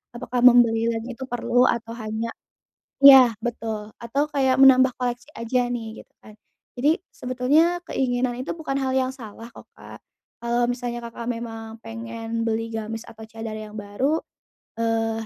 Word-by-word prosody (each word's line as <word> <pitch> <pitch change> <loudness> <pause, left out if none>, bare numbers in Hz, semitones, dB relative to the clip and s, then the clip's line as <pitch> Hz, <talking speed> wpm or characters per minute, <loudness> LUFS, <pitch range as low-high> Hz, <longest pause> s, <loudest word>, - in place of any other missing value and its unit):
apakah 245 +1 -3
membeli 230 -2 +6
lainnya 230 +1 -3
itu 265 +2 -7
perlu 245 0 +2
atau 230 -1 -1
hanya 220 0 -4 0.7
iya, 265 -4 +9
betul 220 -3 -4
atau 280 +6 -2
kayak 265 -3 +2
menambah 260 -1 +6
koleksi 245 -1 -3
aja 245 +2 0
nih 225 -2 -5
gitu - - -34
kan. 215 - -14 0.4
Jadi 295 +6 +3 0.2
sebetulnya 290 +8 +1
keinginan 245 -1 -1
itu 260 +6 -4
bukan 275 -4 -3
hal 260 -1 -1
yang 260 -1 +1
salah 230 -2 -11
kok - - -14
Kak, - - -12 0.4
kalau 235 +1 +1
misalnya 240 -1 -4
Kakak 235 0 -8
memang 225 -1 -7
pengen 230 0 -5
beli 225 0 -2
gamis 225 0 -5
atau 220 0 -13
cadar 225 0 -7
yang 215 -1 -9
baru, 220 +9 -1 0.6
eee, 225 -1 -1
235 Hz, 155 wpm, -23 LUFS, 225-255 Hz, 0.7 s, iya